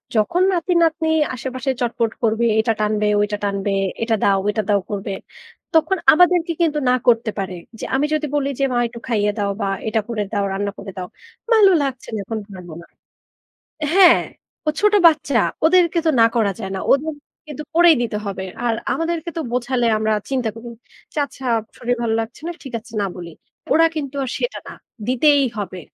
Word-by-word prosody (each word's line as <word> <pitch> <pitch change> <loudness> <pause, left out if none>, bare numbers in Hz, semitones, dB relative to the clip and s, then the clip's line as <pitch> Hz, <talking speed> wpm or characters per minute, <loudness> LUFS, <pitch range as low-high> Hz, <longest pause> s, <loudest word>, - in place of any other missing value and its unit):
যখন 220 - +2
নাতি-নাতনি 335 -2 +1 0.3
আশেপাশে 260 +2 -4
চটপট 230 -1 0
করবে, 225 +1 +2
এটা 225 0 +2
টানবে, 210 0 +1
ওইটা 210 0 -1
টানবে, 200 0 -1 0.3
এটা 230 -1 +1
দাওটা, 195 -1 +3
ওইটা 215 +1 +1
দাও 205 - +4
করবে। 200 0 -3 0.6
তখন 365 +4 +3 0.2
আমাদেরকে 355 0 +4
কিন্তু 305 -3 +2
না 250 - +4
করতে 230 -2 +3
পারে। 190 -1 -3 0.3
যে - - -4
আমি 285 +2 +2
যদি 310 0 0
বলি 280 -1 0
যে, - - +1
"মা - - +1
একটু 235 0 -10
খাইয়ে 210 -3 +1
দাও 200 -1 0
বা 200 - 0 0.2
এটা 220 0 +1
করে 215 -3 -1
দাও, 200 -1 +1
রান্না 200 +1 -2
করে 195 - -7
দাও।" 180 -1 -4 0.4
"ভালো 420 -4 +6
লাগছে 265 -2 -4
না, 215 - -3
এখন 220 +2 -4
পারব 180 -3 -10
না।" - - -14 1.1
হ্যাঁ, 370 -3 +7 0.5
ও - - +5
ছোট 420 0 +4
বাচ্চা 290 -5 +2 0.3
ওদেরকে 340 0 +4
তো - - +4
না - - +8
করা 215 -4 +2
যায় 190 -2 -5
না। - - -3
ওদের 305 +3 +2 0.3
কিন্তু 300 0 -7
করেই 340 -2 +7
দিতে 225 -3 -3
হবে। 190 -1 -4 0.2
আর 235 - +2 0.2
আমাদেরকে 330 0 -2
তো - - 0
বোঝালে, 245 0 0
আমরা 220 0 +1 0.2
চিন্তা 255 -4 0
করি। 230 +1 -10 0.5
যে - - -12
আচ্ছা 265 -1 -12 0.3
শরীর 245 0 -1
ভাল 230 -2 0
লাগছে 225 - -8
না, - - -2
ঠিক 265 -4 -9
আছে 230 +1 -18
না 200 - +1
বলি। 175 -2 -8 0.4
ওরা 325 +1 +5
কিন্তু 285 -2 -4
আর 260 - -4
সেটা - - -3
না। - - -8 0.3
দিতেই 280 +3 +4
হবে। 185 -2 -5
240 Hz, 185 wpm, -20 LUFS, 210-310 Hz, 1.1 s, না